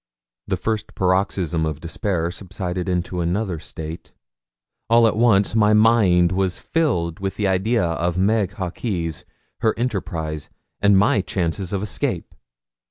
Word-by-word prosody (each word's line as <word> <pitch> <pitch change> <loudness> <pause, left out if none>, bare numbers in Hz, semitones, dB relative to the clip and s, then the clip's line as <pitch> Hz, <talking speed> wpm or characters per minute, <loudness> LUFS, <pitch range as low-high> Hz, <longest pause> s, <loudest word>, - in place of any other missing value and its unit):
The - - 0
first 110 -2 -3
paroxysm 95 -3 +1
of 80 -2 -2
despair 85 +1 -2
subsided 95 -1 -4
into 90 0 -1
another 90 0 -1
state. 80 +2 -8 0.8
All 115 0 +6
at 110 - +2
once 110 -3 +3
my 105 -1 +4
mind 105 -6 +4
was 95 -1 0
filled 90 - -1
with 95 0 -3
the 105 -1 0
idea 95 +3 +1
of 85 +1 -1
Meg 100 0 +2
Hawkes, 90 - -3 0.3
her 110 -2 +1
enterprise, 80 - -3 0.3
and 100 -1 +5
my 100 0 +4
chances 90 0 -2
of 100 -1 -2
escape. 105 - -2
95 Hz, 135 wpm, -22 LUFS, 85-105 Hz, 0.8 s, All